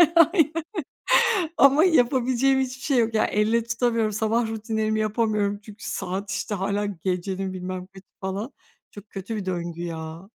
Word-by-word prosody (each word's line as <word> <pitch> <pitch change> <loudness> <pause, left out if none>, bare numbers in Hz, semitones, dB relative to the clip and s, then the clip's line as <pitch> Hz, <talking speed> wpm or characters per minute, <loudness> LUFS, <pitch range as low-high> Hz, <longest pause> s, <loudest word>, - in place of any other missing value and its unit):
Aynen. 330 -1 +4 0.9
Ama 275 +3 +6
yapabileceğim 260 -3 +3
hiçbir 260 0 -3
şey 275 -2 +1
yok. 230 -1 +2
Yani, 215 - +2
elle 220 +3 +2
tutamıyorum, 230 -1 0
sabah 220 +2 +1
rutinlerimi 220 0 -1
yapamıyorum. 215 -2 0
Çünkü 210 -1 -11
saat, 190 +2 -4
işte, 195 +2 -2
hâlâ 200 +2 -1
gecenin 190 0 -3
bilmem 185 0 -5
kaçı, 190 -1 -15 0.2
falan. 200 +6 -4 0.4
Çok 205 0 -12
kötü 195 +3 -5
bir 205 - -4
döngü, 175 -2 -3
ya. 165 +2 -6
215 Hz, 145 wpm, -25 LUFS, 190-235 Hz, 0.9 s, Ama